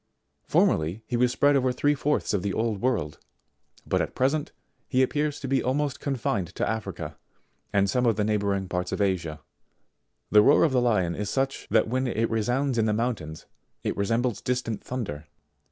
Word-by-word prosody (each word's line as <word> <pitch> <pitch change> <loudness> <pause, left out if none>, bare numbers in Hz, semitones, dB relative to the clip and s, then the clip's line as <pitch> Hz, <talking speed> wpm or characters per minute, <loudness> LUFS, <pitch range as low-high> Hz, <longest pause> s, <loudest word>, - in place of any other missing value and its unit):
Formerly 85 +8 +2
he 120 - -3
was 125 +1 +3
spread 145 +3 +3
over 130 -2 +2
three 145 +4 +2
fourths 150 -3 0
of 100 - +1
the 100 +1 -2
old 110 -3 -1
world, 115 -13 -1 0.7
but - - +1
at - - -4
present, 140 +4 0 0.4
he 130 -1 +3
appears 150 +2 -1
to 135 - -5
be 135 -1 +2
almost 140 +3 -1
confined 115 - -1
to - - -1
Africa 110 -1 -4 0.5
and 100 0 +3
some 125 +4 +1
of 115 - +3
the 105 - 0
neigh 105 0 +1
bouring 100 -1 -1
parts 90 0 -2
of - - -2
Asia. 85 -6 -1 0.9
The 105 - +8
roar - - +5
of 160 - +3
the 125 -1 +3
Lion 105 -8 +2
is 105 +2 -3
such, 135 0 -1
that - - +3
when 130 +3 0
it 115 -1 0
resounds 125 +3 0
in 110 - +3
the 105 - +1
mountains 105 -9 -3 0.4
it - - -1
resembles 115 +4 0
distant 125 -4 -2
thunder. 80 -12 -5
115 Hz, 185 wpm, -26 LUFS, 100-130 Hz, 0.9 s, The